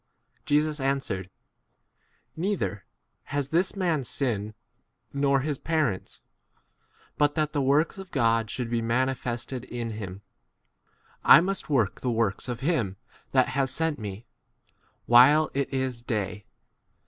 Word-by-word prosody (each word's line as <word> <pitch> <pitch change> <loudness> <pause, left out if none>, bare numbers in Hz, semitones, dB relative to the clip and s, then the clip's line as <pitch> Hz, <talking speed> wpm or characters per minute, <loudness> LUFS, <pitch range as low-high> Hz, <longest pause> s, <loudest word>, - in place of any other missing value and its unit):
Jesus 150 +1 +2
answered, 135 -9 -1 1.1
Neither 170 - -2 0.4
has 140 -1 -2
this 175 +6 +1
[man] 170 -7 0
sinned 110 -4 -2 0.6
nor 140 -1 +2
his 145 -1 -2
parents, 155 - -1 1.0
but 145 0 +3
that 155 -2 0
the 145 - +1
works 145 +7 +2
of 190 -1 -9
God 115 -6 +1
should 125 0 -3
be 120 -1 +1
manifested 125 +1 -2
in 120 -2 -5
him. 100 -2 -7 1.0
4 - - +2
I - - +9
must 195 0 -3
work 115 -9 +1
the 125 - -1
works 115 -1 -1
of 120 0 -4
him 130 - 0 0.3
that 130 -2 +3
has 135 0 0
sent 160 +2 -1
me, 105 +1 -7 0.8
while 145 +6 +6
it 140 0 -1
is 130 -3 -2
day. 105 -4 -3
130 Hz, 130 wpm, -27 LUFS, 115-150 Hz, 1.1 s, I